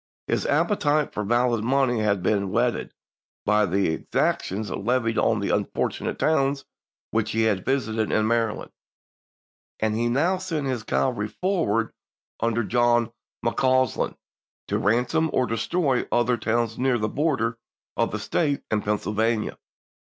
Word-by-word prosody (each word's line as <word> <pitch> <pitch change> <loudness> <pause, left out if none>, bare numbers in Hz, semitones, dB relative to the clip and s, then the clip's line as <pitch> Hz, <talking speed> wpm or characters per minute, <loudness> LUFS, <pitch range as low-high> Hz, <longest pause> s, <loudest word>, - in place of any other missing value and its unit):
His - - -1
appetite 150 -8 +1
for 105 - -2
valid 120 +1 +1
money 130 -1 +2
had 100 -3 +1
been 100 0 +1
whetted - - 0 0.5
by 105 0 +3
the 95 0 +1
exactions 100 +5 -1
levied 115 +1 0
on 115 -1 +2
the 100 - -1
unfortunate - - -2
towns 140 -3 +1 0.5
which 110 0 0
he 110 0 +2
had 105 -4 +1
visited 110 -5 0
in 110 - +2
Maryland, 115 -1 0 1.1
and 110 0 +1
he 120 +1 +1
now 160 +10 +2
sent 165 -6 -3
his 130 -4 -1
cavalry 110 0 0
forward 155 - 0 0.5
under 115 +1 +1
John 120 0 +2 0.3
McCausland 130 +1 +1 0.5
to - - 0
ransom 125 +10 +2
or 130 - +2
destroy 130 +4 0
other 120 +1 +2
towns 115 -1 -1
near 130 -1 +2
the 105 -1 -1
border 115 -4 0 0.4
of - - +1
that - - -2
State 145 -4 0
and 105 -1 +1
Pennsyl 105 0 -1
vania. 110 0 0
115 Hz, 140 wpm, -25 LUFS, 110-130 Hz, 1.1 s, by